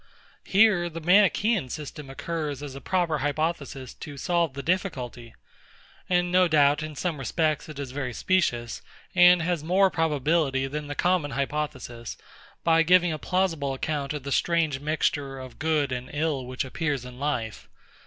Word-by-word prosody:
Here 195 Hz, -4 st, +4 dB
the 165 Hz, 0 st, -7 dB
MANICHAEAN 200 Hz, -, +3 dB
system 150 Hz, 0 st, -7 dB
occurs 145 Hz, 0 st, -4 dB
as 145 Hz, -2 st, -6 dB
a 135 Hz, -, -9 dB
proper 175 Hz, -5 st, 0 dB
hypothesis 145 Hz, -3 st, -2 dB
to 145 Hz, -4 st, -9 dB
solve 170 Hz, -2 st, 0 dB
the 140 Hz, -, -5 dB
difficulty: 130 Hz, -, -3 dB, 0.7 s
and 175 Hz, -1 st, +2 dB
no 180 Hz, 0 st, +5 dB
doubt, 145 Hz, -2 st, +4 dB
in 155 Hz, -1 st, -6 dB
some 160 Hz, 0 st, -2 dB
respects, 155 Hz, +4 st, -1 dB
it 155 Hz, -, -9 dB
is 140 Hz, -3 st, -5 dB
very 130 Hz, -2 st, -3 dB
specious, 120 Hz, -6 st, 0 dB, 0.3 s
and 175 Hz, -1 st, +6 dB
has 170 Hz, -2 st, -1 dB
more 190 Hz, +3 st, +3 dB
probability 150 Hz, -3 st, +1 dB
than 145 Hz, +2 st, -5 dB
the 145 Hz, -, -5 dB
common 175 Hz, -3 st, +1 dB
hypothesis, 135 Hz, -5 st, -4 dB, 0.5 s
by 165 Hz, -1 st, +4 dB
giving 175 Hz, 0 st, +4 dB
a 155 Hz, -, -5 dB
plausible 165 Hz, -8 st, 0 dB
account 140 Hz, 0 st, -2 dB
of 150 Hz, -3 st, -5 dB
the 140 Hz, -, -5 dB
strange 160 Hz, -3 st, +1 dB
mixture 145 Hz, -2 st, -1 dB
of 130 Hz, -2 st, -10 dB
good 155 Hz, -2 st, +1 dB
and 125 Hz, 0 st, -4 dB
ill 145 Hz, -4 st, -1 dB
which 130 Hz, +1 st, -3 dB
appears 140 Hz, -1 st, -2 dB
in 125 Hz, 0 st, -10 dB
life. 125 Hz, -7 st, -3 dB
150 Hz, 160 wpm, -26 LUFS, 135-170 Hz, 0.7 s, and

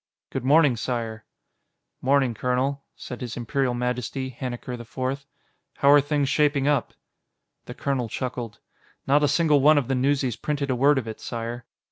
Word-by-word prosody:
"Good 135 Hz, -, -3 dB
morning, 145 Hz, -2 st, +4 dB
Sire." 115 Hz, -2 st, -3 dB, 0.8 s
"'Morning, 135 Hz, -2 st, +2 dB
colonel," 130 Hz, +4 st, -1 dB
said 125 Hz, -, -8 dB
His 120 Hz, -2 st, -5 dB
Imperial 130 Hz, 0 st, -1 dB
Majesty, 125 Hz, +2 st, -2 dB
Hannikar 125 Hz, 0 st, -5 dB
IV. 130 Hz, +3 st, -4 dB, 0.5 s
"How 140 Hz, -, +4 dB
are 145 Hz, 0 st, +7 dB
things 145 Hz, -1 st, 0 dB
shaping 145 Hz, -1 st, +2 dB
up?" 145 Hz, -6 st, +1 dB, 0.7 s
The -, -, -8 dB
colonel 130 Hz, -4 st, -2 dB
chuckled. 120 Hz, -3 st, -4 dB, 0.5 s
"Not 145 Hz, +2 st, +3 dB
a -, -, +5 dB
single 150 Hz, -1 st, +3 dB
one 150 Hz, +2 st, +6 dB
of 140 Hz, -4 st, +1 dB
the -, -, +2 dB
newsies 130 Hz, -2 st, +1 dB
printed 145 Hz, -2 st, -2 dB
a -, -, +1 dB
word 140 Hz, +3 st, +4 dB
of 125 Hz, -4 st, -2 dB
it, 110 Hz, -, -6 dB
Sire." 115 Hz, 0 st, -5 dB
130 Hz, 160 wpm, -25 LUFS, 120-140 Hz, 0.8 s, are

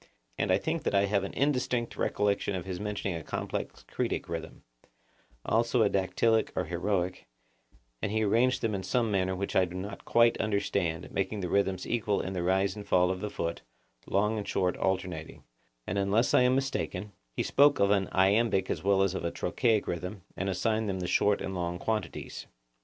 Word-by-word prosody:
And -, -, 0 dB
I 95 Hz, -, +5 dB
think 160 Hz, +10 st, -2 dB
that -, -, -1 dB
I 100 Hz, 0 st, +4 dB
have 100 Hz, -1 st, +1 dB
an 100 Hz, -, -5 dB
indistinct 125 Hz, -4 st, 0 dB
recollection 100 Hz, -1 st, 0 dB
of 90 Hz, -1 st, -4 dB
his 95 Hz, -2 st, -4 dB
mentioning 105 Hz, -3 st, -3 dB
a 80 Hz, -, -5 dB
complex -, -, -4 dB
Cretic -, -, -2 dB
rhythm; 80 Hz, -1 st, -6 dB, 0.8 s
also 115 Hz, +1 st, +2 dB
a 105 Hz, -, +2 dB
dactylic 110 Hz, +4 st, +2 dB
or -, -, 0 dB
heroic, 90 Hz, 0 st, -2 dB, 0.7 s
and 100 Hz, -, -1 dB
he 110 Hz, 0 st, +1 dB
arranged 115 Hz, +5 st, +2 dB
them 110 Hz, -2 st, +1 dB
in 95 Hz, -, -2 dB
some 115 Hz, +2 st, 0 dB
manner 95 Hz, -1 st, +1 dB
which 100 Hz, +1 st, -4 dB
I 95 Hz, -, +5 dB
do 90 Hz, 0 st, -9 dB
not 100 Hz, +2 st, -6 dB
quite 115 Hz, 0 st, +4 dB
understand, 100 Hz, -5 st, -1 dB
making 100 Hz, +1 st, -2 dB
the 90 Hz, -, -3 dB
rhythms 95 Hz, -1 st, +1 dB
equal 110 Hz, -3 st, 0 dB
in 95 Hz, -, -3 dB
the 90 Hz, -, -2 dB
rise 95 Hz, +3 st, +1 dB
and 105 Hz, -, -7 dB
fall 90 Hz, 0 st, +3 dB
of 95 Hz, -, -3 dB
the 105 Hz, -, -2 dB
foot, 85 Hz, -3 st, -3 dB, 0.5 s
long 105 Hz, +2 st, +1 dB
and 100 Hz, -, -6 dB
short 90 Hz, -2 st, +1 dB
alternating; 90 Hz, -4 st, -2 dB, 0.4 s
and, -, -, -1 dB
unless 100 Hz, +5 st, +2 dB
I -, -, +6 dB
am 125 Hz, +1 st, +4 dB
mistaken, 105 Hz, -7 st, -2 dB, 0.2 s
he -, -, 0 dB
spoke 145 Hz, +1 st, +4 dB
of 100 Hz, 0 st, +4 dB
an 100 Hz, -2 st, +2 dB
iambic 95 Hz, 0 st, +3 dB
as 80 Hz, -, -3 dB
well 95 Hz, 0 st, +4 dB
as 95 Hz, -1 st, +1 dB
of 95 Hz, -, -4 dB
a 85 Hz, -, 0 dB
trochaic 110 Hz, +3 st, +1 dB
rhythm, 90 Hz, +3 st, -4 dB
and 95 Hz, +1 st, -2 dB
assigned 110 Hz, +4 st, 0 dB
to 95 Hz, -, -1 dB
them 90 Hz, -, -3 dB
short 100 Hz, +3 st, +2 dB
and 95 Hz, -, -4 dB
long 90 Hz, -1 st, -2 dB
quantities. 110 Hz, +4 st, -4 dB
100 Hz, 195 wpm, -29 LUFS, 95-110 Hz, 0.8 s, I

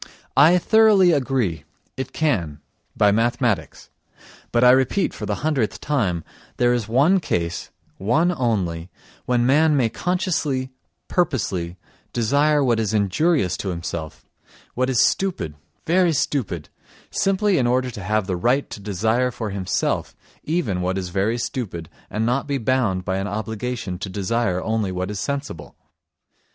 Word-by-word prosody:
I 160 Hz, +6 st, +6 dB
thoroughly 210 Hz, -2 st, +5 dB
agree, 130 Hz, -, 0 dB, 0.3 s
it 130 Hz, -, -5 dB
can—by 90 Hz, -, -1 dB
mathematics. 115 Hz, -, -1 dB, 0.6 s
But 120 Hz, +1 st, +2 dB
I 125 Hz, -, +8 dB
repeat 130 Hz, +9 st, +2 dB
for -, -, -6 dB
the -, -, -3 dB
hundredth 135 Hz, -9 st, 0 dB
time, 100 Hz, -, -1 dB, 0.3 s
there 120 Hz, 0 st, +3 dB
is 120 Hz, -4 st, -1 dB
one 145 Hz, +12 st, +4 dB
case, 85 Hz, -, -2 dB, 0.3 s
one 155 Hz, -, +2 dB
only, 95 Hz, -, -1 dB, 0.4 s
when 120 Hz, -1 st, +2 dB
man 150 Hz, +3 st, +4 dB
may 120 Hz, -4 st, +2 dB
consciously, 150 Hz, -, -1 dB, 0.4 s
purposely, 95 Hz, -, -1 dB, 0.4 s
desire 145 Hz, +5 st, +2 dB
what 120 Hz, -3 st, +2 dB
is 110 Hz, -1 st, 0 dB
injurious 100 Hz, -, +2 dB
to 100 Hz, -, -4 dB
himself, 85 Hz, -3 st, -5 dB, 0.5 s
what 130 Hz, +1 st, 0 dB
is 125 Hz, -3 st, +1 dB
stupid, 180 Hz, -, -1 dB, 0.3 s
very 175 Hz, 0 st, +3 dB
stupid—simply 155 Hz, -, -1 dB
in 120 Hz, -, +2 dB
order 125 Hz, +1 st, +1 dB
to 105 Hz, -, -8 dB
have 105 Hz, +2 st, 0 dB
the 95 Hz, -2 st, -2 dB
right 125 Hz, +10 st, +1 dB
to -, -, -6 dB
desire 110 Hz, +5 st, 0 dB
for 115 Hz, -3 st, -5 dB
himself 95 Hz, -2 st, -1 dB, 0.3 s
even 130 Hz, -, -1 dB
what 90 Hz, +1 st, -1 dB
is 90 Hz, -2 st, -3 dB
very 100 Hz, +6 st, 0 dB
stupid 100 Hz, -9 st, -4 dB, 0.2 s
and 110 Hz, +1 st, -1 dB
not 125 Hz, +3 st, +2 dB
to -, -, -11 dB
be 140 Hz, -1 st, 0 dB
bound 115 Hz, -7 st, 0 dB
by 95 Hz, -1 st, -1 dB
an 95 Hz, +1 st, -2 dB
obligation 110 Hz, -1 st, -4 dB
to 100 Hz, -, -5 dB
desire 95 Hz, -1 st, -1 dB
only 110 Hz, -3 st, -1 dB
what 90 Hz, +2 st, -3 dB
is 105 Hz, -, -4 dB
sensible. 140 Hz, -, -5 dB
120 Hz, 145 wpm, -22 LUFS, 95-140 Hz, 0.6 s, I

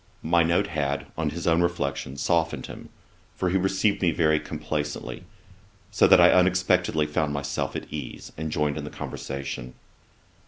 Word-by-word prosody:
My 85 Hz, +1 st, +3 dB
note 85 Hz, +4 st, +2 dB
had, 70 Hz, -6 st, -2 dB
on 80 Hz, -1 st, -1 dB
his 85 Hz, +3 st, -6 dB
own 85 Hz, 0 st, +3 dB
reflection, 70 Hz, -5 st, -2 dB
softened 80 Hz, +3 st, 0 dB
him, -, -, -10 dB, 0.5 s
for 90 Hz, -, -1 dB
he 95 Hz, -, +3 dB
received 95 Hz, +2 st, +1 dB
me 90 Hz, -, +3 dB
very 80 Hz, -1 st, +2 dB
complacently; 75 Hz, -5 st, -4 dB, 0.7 s
so -, -, +4 dB
that -, -, +7 dB
I -, -, +8 dB
unexpectedly 90 Hz, -3 st, +3 dB
found 75 Hz, 0 st, -1 dB
myself 70 Hz, 0 st, -3 dB
at -, -, -4 dB
ease, 75 Hz, -5 st, -7 dB
and 80 Hz, 0 st, -4 dB
joined 75 Hz, 0 st, 0 dB
in -, -, -5 dB
the 75 Hz, -, -6 dB
conversation. 70 Hz, -4 st, -6 dB
80 Hz, 160 wpm, -26 LUFS, 75-85 Hz, 0.7 s, I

